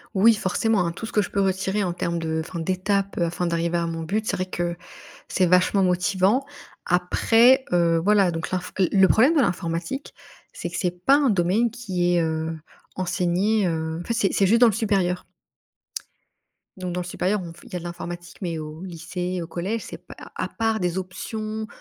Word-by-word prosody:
Oui 220 +4 +6
forcément, 200 0 +1
hein, 170 - -1
tout 195 - -7
ce 225 - -8
que 210 - +4
je - - -4
peux 200 - -2
retirer 190 +1 0
en 175 - -2
termes 170 -1 -2
de 160 -1 -2
enfin, 170 - -6
d'étapes, 190 +3 -1
heu, 175 - +2
afin 170 +1 -1
d'arriver 170 0 0
à 170 - -1
mon 165 0 -4
but, 210 +6 -1
c'est 200 - 0
vrai 185 0 -2
que 175 -2 -3 0.5
c'est 185 - +2
vachement 180 +2 +3
motivant. 190 +7 +2 0.4
Après, 225 +8 +4
heu, 170 -1 +3
voilà 200 -3 +4
donc 165 -1 -4
l'info 185 0 -3
le 185 - +3
le 190 -1 +5
problème 265 - +4
de - - +4
l'informatique, 175 +4 -2 0.4
c'est - - -5
que 175 - -8
c'est 180 -1 -3
pas 275 - +7
un 285 -2 +3
domaine 200 +4 +2
qui 180 -7 -1
est, 170 - +3
heu, 160 0 -2 0.4
enseigné, 185 +3 +1
heu, 160 0 -2
en - - -7
fait 235 - -1
c'est 215 -5 +1
c'est 195 - +3
juste 230 +4 +4
dans 245 - +7
le 215 - +2
supérieur 195 -5 0 1.5
donc 180 -1 -4
dans 180 - -2
le - - -6
supérieur, 185 +3 -1
on 165 - -8
f - - -17
il - - -15
y - - -3
a 180 - -2
de - - -11
l'informatique, 175 0 -7
mais 170 -3 -2
au 155 +2 -8
lycée, 180 +1 -4
au 165 - -6
collège, 190 +7 -3
c'est - - -8
p - - -13
à - - -12
à - - -4
part 225 -1 -1
des 180 0 -1
options 215 +4 -5
185 Hz, 215 wpm, -24 LUFS, 175-205 Hz, 1.5 s, pas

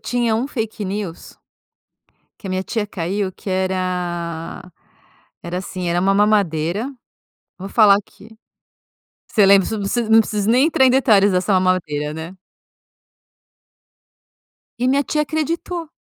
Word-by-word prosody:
tinha 240 -2 0
um 240 +5 -1
fake 220 -4 -4
news 195 -3 -6 1.0
que - - -9
a - - -4
minha 185 0 -1
tia 215 +1 -3
caiu 190 +1 -3
que 195 - -10
era 180 -2 -3 0.7
era 175 +1 -4
assim, 185 -1 -5
era 175 +1 +1
uma 195 +2 +2
mamadeira, 200 - +1 0.7
vou 190 +1 -7
falar 210 -2 +6
aqui. 205 +1 -8 1.0
Você 210 - +3
lembra? 195 -1 +5
Preciso 220 - -3
não 195 - -2
preciso 235 0 -1
não 225 0 +7
preciso 210 -1 -1
nem 255 +5 +4
entrar 285 -5 +3
em - - +5
detalhes 215 -6 +4
dessa 180 +2 +1
mamadeira, 170 -6 0
né? 160 +2 -7 2.5
E 250 - +1
minha 275 +2 +2
tia 300 +2 -1
acreditou. 325 +2 -3
200 Hz, 140 wpm, -20 LUFS, 180-225 Hz, 2.5 s, não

